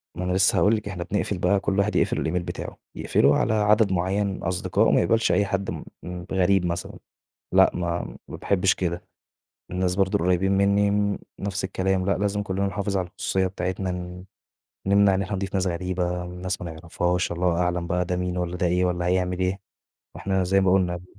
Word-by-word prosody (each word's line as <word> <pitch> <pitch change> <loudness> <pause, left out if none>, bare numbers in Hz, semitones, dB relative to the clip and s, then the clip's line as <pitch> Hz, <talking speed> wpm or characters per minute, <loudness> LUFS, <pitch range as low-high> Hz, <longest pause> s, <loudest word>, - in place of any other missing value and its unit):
ما 90 - -4
أنا 90 - -1
لسّه 95 0 +4
هاقول 105 +3 +4
لِك 105 -1 -5
إحنا 90 -3 -4
بنقفل 100 0 -2
بقى، 100 +2 +2
كل 100 0 -1
واحد 105 +2 +1
يقفل - - +1
الإيميل 90 +2 -1
بتاعه. 90 - -6 0.2
يقفله - - +3
على 110 - +1
عدد 105 -1 +3
معيّن 95 +3 0
من 95 - -5
أصدقاء، 90 +1 +1
ما - - +4
يقبلش 115 +6 +2
أي 100 - +3
حد 95 0 -2
م - - -6 0.2
م 90 0 -6
غريب 95 0 +2
مثلًا. 85 0 -4 0.5
لأ، - - +6
ما 85 -1 -3
ما - - -7
باحبش 95 -1 +2
كده. 85 -1 -3 0.7
الناس 90 0 0
برضه 95 -1 +2
القريبين 90 +2 +2
منِّي 100 +1 +3
م 100 0 +1 0.2
نفس 100 0 -3
الكلام 95 0 0
لأ، 100 - +1
لازم 105 +1 -1
كُلّنا 100 0 -1
نحافظ 100 0 -2
على 90 -2 -1
الخصوصية 95 +1 -1
بتاعتنا، 95 0 -3
ن 90 0 -7 0.6
نمنع 100 0 +4
إن 95 - 0
إحنا 95 +1 -3
نضيف 95 0 -4
ناس 95 -1 +1
غريبة، 90 0 -2
ناس 90 +1 -4
ما 85 - -5
نعرفهاش 85 +2 -1
والله 85 0 0
أعلم 90 -1 0
بقى 90 0 0
ده 90 0 -2
مين 90 0 -2
والّا 90 0 -2
ده 90 - 0
إيه 90 +1 +2
والّا 90 -1 -1
هيعمل 90 0 0
إيه؟ 95 +1 -1 0.6
إحنا 95 -1 0
زي 95 +2 +3
ما 95 -1 +3
قُلنا 90 -2 +2
ب 90 - -11
95 Hz, 205 wpm, -24 LUFS, 90-100 Hz, 0.7 s, لأ